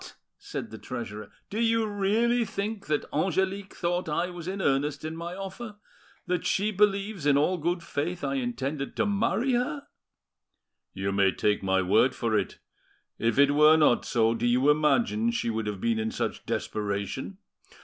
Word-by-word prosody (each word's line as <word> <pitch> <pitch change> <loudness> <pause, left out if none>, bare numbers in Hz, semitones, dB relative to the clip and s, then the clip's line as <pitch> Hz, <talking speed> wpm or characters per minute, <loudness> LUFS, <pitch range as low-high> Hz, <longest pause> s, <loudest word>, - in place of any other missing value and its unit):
said - - -6
the - - -8
treasurer, 105 0 -6 0.2
"do 210 - -2
you 230 -1 +2
really 215 +4 +1
think 205 0 -4
that 150 -1 0
Angelique 190 +4 -1
thought 175 -1 -1
I 175 +4 -1
was 175 -1 -8
in 195 +1 -3
earnest 145 -2 0
in 160 +1 -4
my 170 +2 -6
offer?—that 195 -3 -7
she 205 +2 +1
believes 200 -4 +1
in 140 -1 +5
all 175 +5 +2
good 170 +2 -1
faith 170 +2 -3
I 135 -1 -1
intend 135 +2 -3
to - - +1
marry 225 +5 +1
her?" 250 +4 -1 1.1
"You 95 +1 -2
may 100 -1 +3
take 105 +2 0
my 95 -1 +1
word 125 +8 +3
for 115 -2 0
it. - - -1 0.6
If 115 +1 +1
it 140 0 +6
were 150 +2 +6
not 150 -6 +4
so, 115 -1 +2
do 115 - -1
you 130 +4 +4
imagine 215 +10 +2
she 235 - -1
would 110 -1 -3
have 105 -2 -3
been 115 +2 0
in 110 0 -1
such - - -4
desperation? 105 - -3
160 Hz, 170 wpm, -27 LUFS, 120-200 Hz, 1.1 s, it